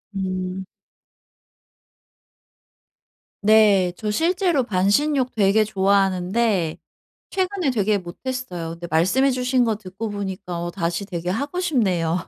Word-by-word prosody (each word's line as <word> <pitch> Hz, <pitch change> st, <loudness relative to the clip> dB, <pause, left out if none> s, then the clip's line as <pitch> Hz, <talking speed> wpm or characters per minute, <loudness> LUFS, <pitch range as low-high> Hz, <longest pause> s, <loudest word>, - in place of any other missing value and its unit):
음. 185 Hz, 0 st, -3 dB, 2.8 s
네. 205 Hz, -4 st, +5 dB
저 215 Hz, -2 st, -2 dB
실제로 345 Hz, -, +1 dB
반신욕 250 Hz, +7 st, +1 dB
되게 215 Hz, -1 st, +3 dB
좋아하는데 195 Hz, -2 st, +1 dB, 0.5 s
최근에 375 Hz, -5 st, 0 dB
되게 210 Hz, -3 st, +1 dB
못했어요. 180 Hz, -2 st, -5 dB
근데 170 Hz, +1 st, -8 dB
말씀해 190 Hz, +13 st, +3 dB
주신 250 Hz, 0 st, +1 dB
거 220 Hz, -2 st, 0 dB
듣고 200 Hz, +2 st, -6 dB
보니까 190 Hz, -3 st, -5 dB
어 175 Hz, -, -3 dB
다시 170 Hz, +1 st, -2 dB
되게 175 Hz, -2 st, -4 dB
하고 285 Hz, -, -3 dB
싶네요. 185 Hz, -, +1 dB
200 Hz, 235 characters per minute, -22 LUFS, 185-250 Hz, 2.8 s, 네